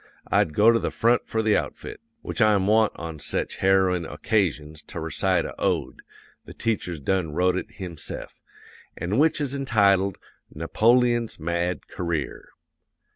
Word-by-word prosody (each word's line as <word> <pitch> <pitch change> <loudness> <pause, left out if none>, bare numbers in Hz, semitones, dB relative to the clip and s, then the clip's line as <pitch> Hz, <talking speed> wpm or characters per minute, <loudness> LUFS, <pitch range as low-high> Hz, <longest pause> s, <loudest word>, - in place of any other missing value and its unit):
I'd 75 - +2
go 110 +2 +6
to 115 - +2
the - - -2
front 120 +1 +1
for 110 0 -1
the 110 -1 +3
outfit. - - -4 0.2
Which - - -4
I'm 105 -3 +4
wont 110 +1 +4
on 80 -2 -7
sech 75 - -2
harrowin' 95 -3 +2
o'casions 75 -3 -1
to - - -6
recite 85 +2 0
a - - -6
ode - - -1 0.4
the - - -12
teacher's 100 -8 -2
done 80 +1 -1
wrote 90 +1 +2
it 95 - -5
himse'f 85 -6 -8 0.6
an' 95 +8 -1
which 160 +1 +3
is 140 -3 -1
entitled 100 -8 +2 0.3
Napoleon's 120 +8 +2
Mad 85 +2 -2
Career. 85 -5 -4
95 Hz, 145 wpm, -24 LUFS, 85-110 Hz, 0.6 s, go